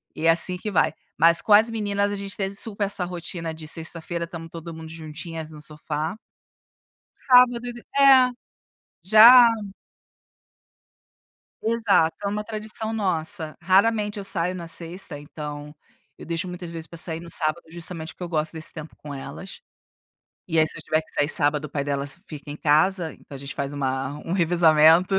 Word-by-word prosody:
e 160 Hz, -, -4 dB
é -, -, +6 dB
assim 170 Hz, +2 st, +2 dB
que 210 Hz, -, -5 dB
vai. 160 Hz, -3 st, +2 dB, 0.2 s
Mas 165 Hz, +2 st, +4 dB
com 210 Hz, -, +2 dB
as 220 Hz, +3 st, +6 dB
meninas 205 Hz, -2 st, -1 dB
a -, -, -2 dB
gente 195 Hz, -1 st, -5 dB
teve 195 Hz, 0 st, -3 dB
super 205 Hz, -1 st, 0 dB
essa 195 Hz, -2 st, 0 dB
rotina 170 Hz, -2 st, -5 dB
de 160 Hz, -1 st, -10 dB
sexta-feira 170 Hz, +1 st, -2 dB
estamos 165 Hz, -2 st, -9 dB
todo 165 Hz, 0 st, -8 dB
mundo 160 Hz, 0 st, -9 dB
juntinhas 160 Hz, 0 st, -7 dB
no 150 Hz, -1 st, -12 dB
sofá. 150 Hz, +3 st, -4 dB, 1.0 s
Sábado 250 Hz, -2 st, +4 dB
e 240 Hz, -, -5 dB
do 240 Hz, -, -11 dB, 0.2 s
É, 265 Hz, -2 st, +7 dB, 0.8 s
já. 235 Hz, +5 st, +9 dB, 2.2 s
Exato, 220 Hz, -8 st, +2 dB
é -, -, 0 dB
uma 210 Hz, +1 st, -3 dB
tradição 220 Hz, 0 st, -4 dB
nossa. 165 Hz, -5 st, -2 dB
Raramente 205 Hz, +3 st, +2 dB
eu 200 Hz, -, -5 dB
saio 180 Hz, -1 st, +1 dB
na 170 Hz, -2 st, -7 dB
sexta, 165 Hz, -2 st, -2 dB
então, 150 Hz, 0 st, -8 dB, 0.4 s
eu -, -, -11 dB
deixo 170 Hz, +2 st, -2 dB
muitas 180 Hz, -1 st, -7 dB
vezes 165 Hz, -1 st, -7 dB
para 170 Hz, +2 st, -10 dB
sair 165 Hz, -1 st, +1 dB
no 170 Hz, 0 st, -11 dB
sábado 155 Hz, +1 st, 0 dB
justamente 165 Hz, -1 st, -4 dB
porque -, -, -13 dB
eu -, -, -6 dB
gosto 155 Hz, -1 st, -1 dB
desse 160 Hz, -1 st, -3 dB
tempo 155 Hz, -1 st, -9 dB
com 150 Hz, -1 st, -10 dB
elas. 140 Hz, -, -9 dB, 0.9 s
E 165 Hz, -2 st, +1 dB
aí 155 Hz, -, +4 dB
se -, -, -7 dB
eu -, -, -8 dB
tiver 155 Hz, 0 st, 0 dB
que -, -, -20 dB
sair 145 Hz, +1 st, +1 dB
sábado 150 Hz, 0 st, +2 dB
o -, -, -9 dB
pai 140 Hz, -1 st, -3 dB
delas 140 Hz, +3 st, -4 dB
fica 150 Hz, -2 st, -9 dB
em 150 Hz, -, -8 dB
casa, 160 Hz, +3 st, +2 dB
então 140 Hz, -, -13 dB
a -, -, -6 dB
gente 140 Hz, +1 st, -8 dB
faz 140 Hz, 0 st, -3 dB
uma 135 Hz, +1 st, -3 dB
um 170 Hz, -, -3 dB
revezamento. 170 Hz, 0 st, +4 dB
170 Hz, 180 wpm, -24 LUFS, 155-200 Hz, 2.2 s, já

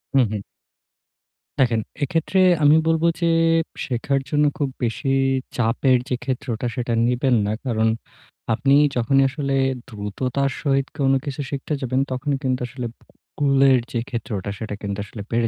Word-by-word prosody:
হুম, 130 Hz, -2 st, +6 dB
হুম। 105 Hz, -2 st, -3 dB, 1.2 s
দেখেন, 115 Hz, -4 st, +3 dB, 0.2 s
এক্ষেত্রে 165 Hz, +6 st, 0 dB, 0.2 s
আমি 145 Hz, +1 st, +7 dB
বলব 160 Hz, 0 st, +2 dB, 0.2 s
যে, 170 Hz, -, +3 dB, 0.6 s
শেখার 135 Hz, +2 st, 0 dB
জন্য 150 Hz, 0 st, +3 dB
খুব 145 Hz, -3 st, 0 dB
বেশি 120 Hz, +4 st, -1 dB, 0.5 s
চাপের 125 Hz, +2 st, +3 dB
যে, 125 Hz, -, +1 dB
ক্ষেত্রটা 125 Hz, -2 st, -3 dB
সেটা 120 Hz, -2 st, -2 dB
নিবেন 125 Hz, +1 st, +2 dB
না। 105 Hz, -, 0 dB
কারণ 110 Hz, -3 st, +1 dB, 0.7 s
আপনি 135 Hz, +5 st, +3 dB, 0.2 s
যখনই 135 Hz, +3 st, +3 dB
আসলে 140 Hz, 0 st, -2 dB, 0.3 s
দ্রুততার 125 Hz, +5 st, -2 dB
সহিত 135 Hz, -2 st, +1 dB
কোন 135 Hz, -2 st, +2 dB
কিছু 140 Hz, -1 st, -4 dB
শিখতে 140 Hz, +2 st, -4 dB
যাবেন, 130 Hz, +1 st, 0 dB
তখন 135 Hz, +3 st, -2 dB
কিন্তু 130 Hz, -1 st, 0 dB
আসলে 125 Hz, -1 st, -5 dB, 0.5 s
কুলের 135 Hz, -2 st, +5 dB
যে, 120 Hz, -, -1 dB
ক্ষেত্রটা 105 Hz, -4 st, -4 dB
সেটা 110 Hz, -2 st, -4 dB
কিন্তু 100 Hz, -1 st, -3 dB
আসলে 105 Hz, +1 st, -9 dB
বেড়ে 115 Hz, 0 st, +2 dB
130 Hz, 145 wpm, -22 LUFS, 115-140 Hz, 1.2 s, আমি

